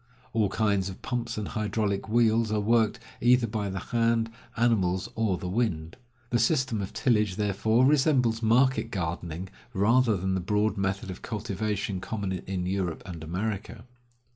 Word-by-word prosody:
All 110 -3 +2
kinds 100 -2 +1
of 95 - -10
pumps 120 -3 -3
and 105 -2 -3
hydraulic 105 -2 -1
wheels 115 -1 +3
are 110 - +1
worked, 110 +1 +2 0.2
either 125 0 +5
by 105 -2 -2
the 95 - -4 0.2
hand, 115 -1 +2 0.3
animals, 95 -6 +2
or 110 -5 0
the 90 - -5
wind. 90 -6 -1 0.4
The 120 - +2
system 130 - +1
of 95 - -5
tillage, 105 -6 +1
therefore, 105 +4 +2
resembles 130 -5 +3
market 120 +1 +3
gardening 85 -1 -4 0.2
rather 115 +2 +3
than 95 +1 -1
the 95 - 0
broad 105 +4 +1
method 95 -1 -2
of 90 - -9
cultivation 105 -2 -3
common 100 -1 -3
in 95 0 -3
Europe 90 -3 -2
and 85 -4 -7
America. 100 +6 -4
105 Hz, 155 wpm, -27 LUFS, 95-115 Hz, 0.4 s, either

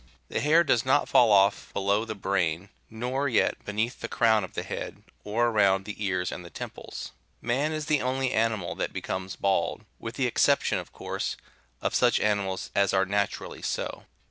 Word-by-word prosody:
83 - - -10
The - - -3
hair 160 +4 +5
does 120 -8 +2
not 130 - +3
fall 120 -3 +5
off 100 0 +3
below 100 +3 +1
the 110 -1 -5
brain, 95 -2 -1 0.2
nor 125 +5 -2
yet 120 - +1
beneath 110 +4 -2
the 115 - -4
crown 110 -3 +3
of 95 - -8
the - - -2
head, - - -6 0.2
or 115 +3 +1
around 100 -3 +3
the 105 0 -6
ears 95 -2 0
and 90 - -6
the 85 - -10
temples. - - -7 0.3
Man 135 +6 0
is 155 -1 -3
the 150 -2 +2
only 130 0 0
animal 110 -6 0
that - - -3
becomes 95 0 -4
bald, 95 -4 0
with 115 +1 -6
the 135 - 0
exception, 120 - +2
of - - -9
course, - - -4 0.5
of - - 0
such - - +3
animals 100 -3 -1
as 100 -1 +2
are 95 0 +3
naturally 100 +1 -2
so. - - -3
105 Hz, 190 wpm, -27 LUFS, 95-120 Hz, 0.5 s, hair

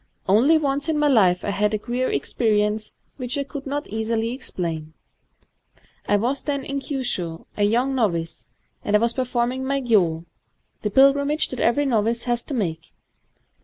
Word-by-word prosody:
" - - -47
Only 240 +12 +5
once 285 0 -1
in 315 - +1
my 295 0 +3
life 190 -10 +3
I 205 - 0
had 210 +1 +1
a - - +1
queer 245 +4 -2
experience 210 -1 0 0.3
which 255 0 -2
I 280 - 0
could 280 0 -8
not 290 +2 -3
easily 225 +1 -2
explain. 165 - -4 1.1
I 205 - +3
was 250 +6 0
then 280 -2 -3
in 275 0 -2
Kyushu, 245 - -2
— - - -39
a 205 - 0
young 245 +6 +1
novice; 170 -10 -2 0.4
and 205 - +1
I - - +6
was 235 +1 +2
performing 250 0 -1
my 275 +1 0
gyo, 180 -10 +1 0.3
— - - -47
the 210 - -1
pilgrimage 280 +5 +3
that 255 - -6
every 285 +5 +2
novice 230 -2 0
has 240 -1 -1
to 280 - -4
make. 165 -8 -3
235 Hz, 180 wpm, -23 LUFS, 210-275 Hz, 1.1 s, I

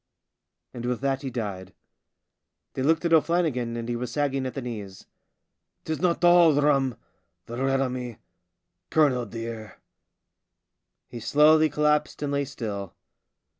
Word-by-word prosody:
And 120 - -7
with 125 -1 -1
that 135 -1 0
he 135 - -4
died. 100 -6 -5 1.0
They - - -4
looked 160 +5 +2
at 170 - +2
O'Flannigan, 155 -8 +1
and 115 0 -5
he 120 - -2
was 120 0 -4
sagging 135 -1 -1
at 130 - -7
the 135 - -3
knees. 105 -6 -7 0.8
"Bedad! - - -46
'tis 160 0 -3
not 175 -1 +1
all 175 -4 +6
rum, 135 -4 +2 0.5
the 120 +3 -4
red 135 0 +1
on 130 -2 -1
me, 125 -3 -6 0.7
colonel, 130 -6 +2
dear." 115 -1 -7 1.3
He 120 - -8
slowly 150 +7 +4
collapsed 150 0 0
and 145 - -2
lay 140 0 0
still. 105 -9 -6
135 Hz, 145 wpm, -26 LUFS, 115-150 Hz, 1.3 s, all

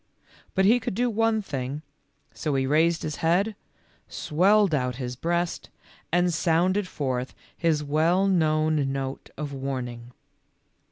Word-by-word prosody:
But 190 - +3
he 230 +5 +5
could 225 - -4
do 245 +2 +1
one 225 0 +1
thing, 140 -2 -4 0.5
so 150 -3 -2
he 135 -1 +1
raised 160 +4 +2
his 155 -1 -3
head, 190 +6 +1 0.5
swelled 195 +4 +2
out 125 -4 0
his 125 -1 -5
breast, 170 +5 -2 0.4
and 175 0 +2
sounded 180 +4 +1
forth 130 -6 -3 0.2
his 160 -3 +1
well 160 +6 +2
known 155 -5 +2
note 135 0 -4
of 150 -2 -4
warn 135 -2 -3
ing. 120 0 -11
155 Hz, 135 wpm, -26 LUFS, 135-185 Hz, 0.5 s, he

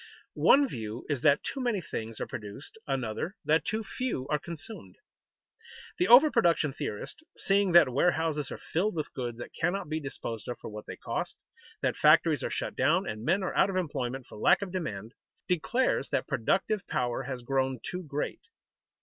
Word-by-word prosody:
One 280 0 +5
view 110 - -6
is 140 -5 -1
that 145 -1 +4
too 275 - -4
many 240 -5 +1
things 115 -9 -6
are - - -2
produced, 105 +6 -8
another 135 - -2
that 160 +2 +3
too 220 +1 -2
few 230 - -3
are 150 0 +1
consumed. 160 - -8 1.0
The 180 - +3
over 270 +7 +8
production 170 - +3
theorist, 105 - -5 0.2
seeing 195 -2 +2
that 170 -4 +8
warehouses 150 +2 +1
are - - -6
filled 185 +4 -1
with 155 -2 -3
goods 120 -3 -4
that 120 - -8
cannot 175 0 -1
be 155 0 -1
disposed 120 -6 -6
of 125 - -4
for - - -8
what 105 0 -8
they - - -7
cost, - - -3 0.5
that - - +1
factories - - +5
are - - -1
shut - - -3
down - - +2
and 110 0 -5
men 190 +9 +2
are 185 - -2
out 195 - +4
of 195 - -3
employment 135 -7 -2
for 105 - -12
lack 200 - +4
of 190 - -6
demand, 115 - -4 0.3
declares 180 - +1
that - - 0
productive 195 - 0
power 120 +1 -1
has 130 -2 -5
grown 130 0 0
too 180 - -4
great. 150 -3 -4
150 Hz, 185 wpm, -29 LUFS, 125-185 Hz, 1.0 s, over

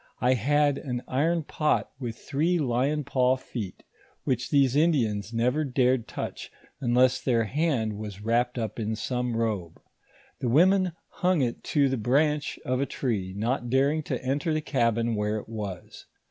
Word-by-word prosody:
1 125 +1 +3
had 145 +4 +2
an 125 -2 -4
iron 160 +5 +1
pot 150 +1 0
with 120 -4 -5
three 160 +5 0
lion 140 +1 0
paw 130 -1 +2
feet, 115 -7 -7 0.4
which 125 -1 -1
these 135 -3 +3
Indians 115 - +2
never 125 +6 +1
dared 130 -3 +1
touch, - - -6 0.3
unless 125 +1 +3
their 120 -3 +2
hand 120 - 0
was 105 -2 -6
wrapped 120 +3 0
up 110 -1 -3
in 110 0 -1
some 125 0 -2
robe. 105 -8 -2 0.6
The 125 - -1
women 185 +6 +4 0.2
hung 180 -3 +1
it 120 -2 -3
to 140 -2 +3
the 135 0 -1
branch 145 +6 +1
of 130 +1 0
a 140 - 0
tree, 100 -8 -2
not 120 +3 -1
daring 140 +5 +2
tota^lter 135 +3 -2
the 155 0 0
cabin 115 -5 +1
where 105 0 0
it 105 - -7
was. 105 -5 -7
125 Hz, 160 wpm, -27 LUFS, 115-145 Hz, 0.6 s, women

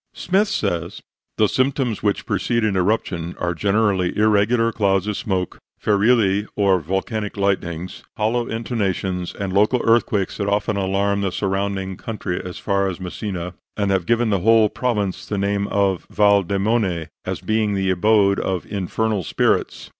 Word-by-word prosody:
Smyth 195 +4 +1
says: 90 - -2 0.3
"The 110 - +4
symptoms 130 -2 0
which 105 -1 0
precede 115 -1 0
an 100 -3 0
eruption 90 -3 -1
are 90 0 -1
generally 100 -1 +1
irregular 110 +2 +3
clouds 95 -3 +1
of 105 -1 -2
smoke, 95 -3 -2 0.2
ferilli 105 -1 +2
or 100 -2 +3
volcanic 100 +6 -3
lightnings, 90 -3 -2 0.2
hollow 115 +3 0
intonations 95 -6 -2
and 100 -2 -4
local 105 +6 +3
earthquakes 115 -4 +2
that 100 - -2
often 105 +1 0
alarm 100 +1 0
the 95 -2 -1
surrounding 95 0 -2
country 105 -5 -4
as 90 -1 -7
far 100 -1 0
as 95 - -6
Messina, 90 -1 -5 0.2
and 100 -2 +1
have 95 -3 0
given 115 -1 +2
the 100 - +2
whole 110 +2 +4
province 105 -7 -2
the 105 - -2
name 100 0 0
of 100 -3 0
Val 100 -1 +4
Demone, 100 -2 0 0.2
as - - -3
being 110 -2 0
the 95 -1 +1
abode 100 +1 +3
of 95 -2 -2
infernal 105 +1 -1
spirits. - - 0
100 Hz, 155 wpm, -21 LUFS, 95-110 Hz, 0.3 s, The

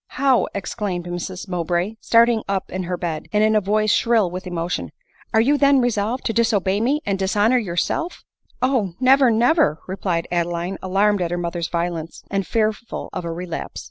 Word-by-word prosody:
" - - -64
How 270 -3 +4
!" - - -21
exclaimed 195 -2 -3
Mrs 175 +2 -5
Mowbray, 175 +2 -1
starting 230 -1 +4
up 195 -1 -2
in 185 -1 -3
her 180 0 -3
bed, 165 -3 -4
and 210 0 +3
in 215 0 +3
a 215 - +4
voice 215 +2 +1
shrill 225 -6 +2
with 185 +1 -6
emotion, 170 - -3 0.2
" - - -30
are 220 - +4
you 285 +5 +2
then 280 -1 +5
resolved 240 0 -1
to 225 - 0
disobey 205 -4 +1
me, 280 +6 +1
and 195 -1 -1
dishonor 205 +6 +2
yourself 215 - -2
?" - - -49
" - - -38
Oh! 235 -9 +1
never, 265 0 +5
never 230 - +3
!" - - -26
replied 185 -3 -2
Adeline, 175 +2 -2
alarmed 200 +1 +2
at 175 - 0
her 175 - -2
mother's 170 -1 -3
violence, 170 -1 -3
and 195 -2 -1
fearful 220 0 -2
of 180 -2 -4
a 170 - -3
relapse. 170 0 -5
195 Hz, 205 wpm, -21 LUFS, 175-230 Hz, 0.2 s, then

